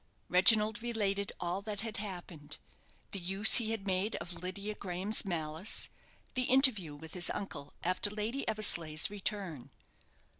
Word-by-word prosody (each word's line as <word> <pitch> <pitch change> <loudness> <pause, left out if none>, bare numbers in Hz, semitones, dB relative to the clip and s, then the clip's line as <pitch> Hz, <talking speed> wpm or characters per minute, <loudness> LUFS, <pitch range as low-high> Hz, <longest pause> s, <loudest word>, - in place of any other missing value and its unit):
Reginald 210 +4 +5
related 200 -4 -1
all 175 +2 -3
that 205 0 -5
had 225 -1 -5
happened; 175 -7 -6 0.5
the 200 - -3
use 195 +4 +2
he 230 -2 +1
had 220 -3 -3
made 190 +2 -1
of 175 - -6
Lydia 185 +4 -5
Graham's 195 +2 0
malice; 165 +1 0 0.4
the 255 0 0
interview 245 - +3
with 160 +2 -11
his 180 -2 0
uncle 145 -8 -6
after 185 +3 +7
Lady 215 +6 -3
Eversleigh's 170 -7 +3
return. 190 - -2
195 Hz, 140 wpm, -32 LUFS, 175-215 Hz, 0.5 s, after